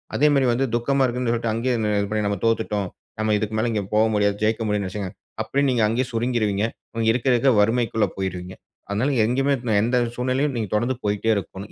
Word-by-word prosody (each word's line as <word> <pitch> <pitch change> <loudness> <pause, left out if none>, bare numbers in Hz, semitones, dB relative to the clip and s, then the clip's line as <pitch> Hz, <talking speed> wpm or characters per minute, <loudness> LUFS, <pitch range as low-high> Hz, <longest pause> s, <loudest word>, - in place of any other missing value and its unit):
அதேமாரி 145 -2 +3
வந்து 125 +3 +1
துக்கமா 135 +3 +1
இருக்குன்னு 125 -1 -1
சொல்லிட்டு 115 -1 -1
அங்கே 120 +3 0 0.3
இது 100 - -1
பண்ணி 105 -1 0
நம்ம 100 -1 -1
தோத்துட்டோம், 105 -3 0 0.3
நம்ம 110 0 +1
இதுக்கு 110 +1 -3
மேல 120 - +1
இங்க 105 -2 -1
போக 110 - +5
முடியாது. 100 -1 +2
ஜெயிக்க 110 +2 +1
முடியாதுன்னு 105 -2 0
நெனைச்சீங்கன்னா, 95 -1 -5 0.3
அப்பிடியே 140 +1 0
நீங்க 115 -3 +2
அங்கேயே 120 +4 0
சுருங்கிருவீங்க. 115 -4 0 0.3
இன்னும் 115 -1 0
இருக்க, 125 +2 -2
இருக்க 125 +3 +4
வறுமைக்குள்ள 115 0 +2
போயிருவீங்க. 90 -1 -4 0.3
அதனால 115 +8 0
எங்கேயுமே, 135 +4 +1 0.3
எந்த 125 +2 +1 0.2
சூழ்நிலையிலும் 130 +3 0
நீங்க 110 -4 -2
தொடர்ந்து 120 +4 0
போயிட்டே 105 +2 +1
இருக்கணும். 100 +1 -6
115 Hz, 185 wpm, -23 LUFS, 105-125 Hz, 0.3 s, போக